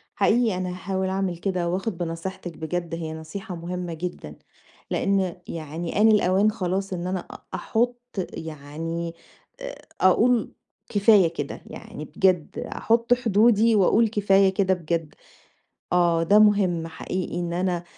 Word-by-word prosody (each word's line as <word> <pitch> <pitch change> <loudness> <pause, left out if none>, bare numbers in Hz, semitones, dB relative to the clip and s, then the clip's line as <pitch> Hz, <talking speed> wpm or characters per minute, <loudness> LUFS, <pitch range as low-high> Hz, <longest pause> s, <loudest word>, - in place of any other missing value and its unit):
حقيقي 230 -3 +3
أنا 185 -1 -2
هاحاول 190 +1 -2
أعمل 190 -2 -1
كده، 180 -2 -1
وآخد 185 +1 -2
بنصيحتِك 170 0 -5
بجد 170 +1 -3
هي 160 -1 -4
نصيحة 180 +5 -7
مهمّة 175 +1 -5
جدًا، 160 - -6 0.6
لإن 195 -3 +1
يعني 165 +4 -4
آن 220 - +7
الأوان 205 0 +4
خلاص 195 -1 -2
إن 175 -1 -3
أنا 185 -1 -3 0.3
أحط 240 +2 0 0.4
يعني 160 +2 -5 0.9
أقول 230 +5 +3 0.4
كفاية 205 -3 +5
كده، - - -5
يعني - - -9
بجد 185 -5 +1
أحط 230 +2 +1
حدودي 225 -1 +4
وأقول 215 +3 +4
كفاية 195 -2 +4
كده 190 -1 +2
بجد، 165 -2 -3 0.8
آه، 170 -2 +3
ده 205 +6 +5
مهم 195 -6 +3
حقيقي 175 +2 -4
إن 170 -1 -3
أنا 175 -1 -1
185 Hz, 125 wpm, -24 LUFS, 170-205 Hz, 0.9 s, آن